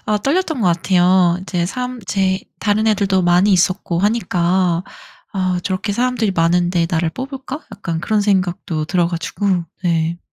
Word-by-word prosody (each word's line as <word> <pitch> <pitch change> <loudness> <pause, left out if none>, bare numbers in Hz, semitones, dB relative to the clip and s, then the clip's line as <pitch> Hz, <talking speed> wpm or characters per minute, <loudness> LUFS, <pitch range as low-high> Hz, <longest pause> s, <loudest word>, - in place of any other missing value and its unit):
어 210 -1 +1
떨렸던 305 - 0
것 195 - +2
같아요. 180 0 +3
이제 180 -2 -2
삼 250 +5 -4
제 190 -1 0 0.2
다른 215 +1 +1
애들도 195 -3 +2
많이 180 +3 +4
있었고 185 -1 +1
하니까. 180 -4 +1 0.5
'아 185 -2 -1
저렇게 190 +2 -2
사람들이 235 -2 0
많은데 175 0 +2
나를 165 -2 0
뽑을까?' 270 - -6
약간 170 -5 -4
그런 215 +4 +1
생각도 180 -5 0
들어 175 -1 +1
가지고. 175 +1 -1 0.2
네. 165 -1 0
185 Hz, 315 characters per minute, -18 LUFS, 175-210 Hz, 0.5 s, 많이